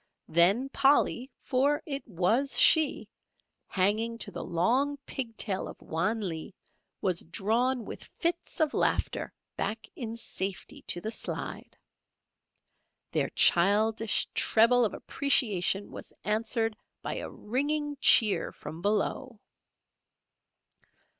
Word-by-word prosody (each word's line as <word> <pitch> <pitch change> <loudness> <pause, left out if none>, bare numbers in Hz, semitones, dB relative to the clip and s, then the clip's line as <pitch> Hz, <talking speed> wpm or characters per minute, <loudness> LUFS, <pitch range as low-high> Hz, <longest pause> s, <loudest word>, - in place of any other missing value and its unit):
Then 190 +10 +3
Polly 270 -2 +2
for 285 +4 0
it 280 -4 -4
was 220 +8 +1
she 315 -2 +5 0.6
hanging 215 +5 +1
to - - -5
the - - -6
long 250 +12 0
pig 230 -4 -4
tail 195 -3 0
of - - -11
Wan 200 +6 -2
Lee, 160 +1 -6 0.5
was 180 -3 0
drawn 230 +7 -1
with - - -9
fits 340 0 -2
of 310 -2 +1
laughter - - -1 0.3
back 220 +1 -3
in 230 -8 -6
safety 195 -4 -6
to 175 - -3
the 220 - -4
slide. - - -6 1.3
Their - - 0
childish 215 +4 +3
treble 235 +2 +4
of 205 - -3
appreciation 205 - +1
was - - -10
answered 225 +1 0 0.3
by - - -4
a - - -5
ringing 290 +5 -2
cheer 215 -4 +5
from 160 - -10
below. 215 +4 -2
225 Hz, 115 wpm, -28 LUFS, 200-265 Hz, 1.3 s, she